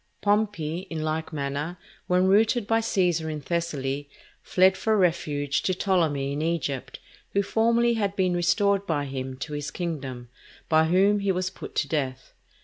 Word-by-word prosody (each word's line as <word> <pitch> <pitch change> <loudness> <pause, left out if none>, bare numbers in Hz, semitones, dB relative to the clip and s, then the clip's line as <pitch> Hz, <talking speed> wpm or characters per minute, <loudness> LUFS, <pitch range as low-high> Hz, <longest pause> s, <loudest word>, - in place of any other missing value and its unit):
Pompey, 205 -5 0
in 160 -2 -3
like 155 +1 -2
manner, 145 +3 -3 0.3
when 180 +1 +3
routed 215 +4 +3
by 225 +2 +2
Cæsar 180 -8 +1
in 155 - -4
Thessaly, 145 -3 -2 0.3
fled 190 +1 +4
for 220 +2 +1
refuge 145 -6 +1
to 185 - 0
Ptolemy 160 -8 +1
in 145 - -2
Egypt, 160 -5 -2 0.3
who 200 - +2
formerly 235 +3 +2
had 200 -3 -1
been 185 -2 +1
restored 200 +3 +2
by 145 -3 0
him 130 -1 -5
to 150 +4 -6
his 145 0 -3
kingdom; 135 -9 -5 0.4
by 160 0 +4
whom 195 +5 +3
he 200 -1 +1
was 185 0 -1
put - - -10
to 145 - +1
death. 135 -4 -3
170 Hz, 160 wpm, -26 LUFS, 145-195 Hz, 0.4 s, fled